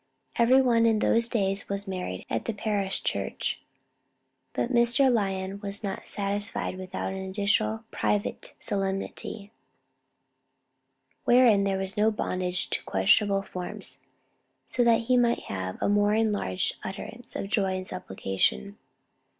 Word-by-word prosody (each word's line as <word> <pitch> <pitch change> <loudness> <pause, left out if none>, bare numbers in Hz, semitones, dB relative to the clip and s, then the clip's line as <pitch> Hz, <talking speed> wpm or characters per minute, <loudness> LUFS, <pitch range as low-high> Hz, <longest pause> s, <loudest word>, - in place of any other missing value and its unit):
Every 255 +3 +5
one 230 -2 +4
in 225 -1 +3
those 230 +2 +3
days 195 -4 0
was 200 0 -3
married 180 - -4
at 115 - -2
the 230 - -1
parish 200 -2 -1
church; - - -2 0.9
but 250 - -1
Mr. 240 +2 +4
Lyon 195 -2 -1
was 200 +1 -6
not 195 -2 -4
satisfied 205 -1 -2
without 185 0 -4
an 190 - -5
additional 205 +3 +1
private 205 -1 -2
solemnity, 195 +1 -3 1.7
"wherein 240 -5 +5
there 195 -1 +1
was 190 +2 -3
no 215 +1 +4
bondage 185 -4 -2
to - - 0
questionable 200 -1 +3
forms, 180 -2 -7 0.7
so 245 - 0
that 230 -1 +5
he 250 +2 +2
might 240 -1 +2
have 95 -1 -5
a - - 0
more 205 +1 +3
enlarged 205 - 0
utterance 225 +5 -7
of - - -3
joy 195 -3 +1
and 185 0 -4
supplication." 95 - -2
200 Hz, 135 wpm, -27 LUFS, 190-225 Hz, 1.7 s, Every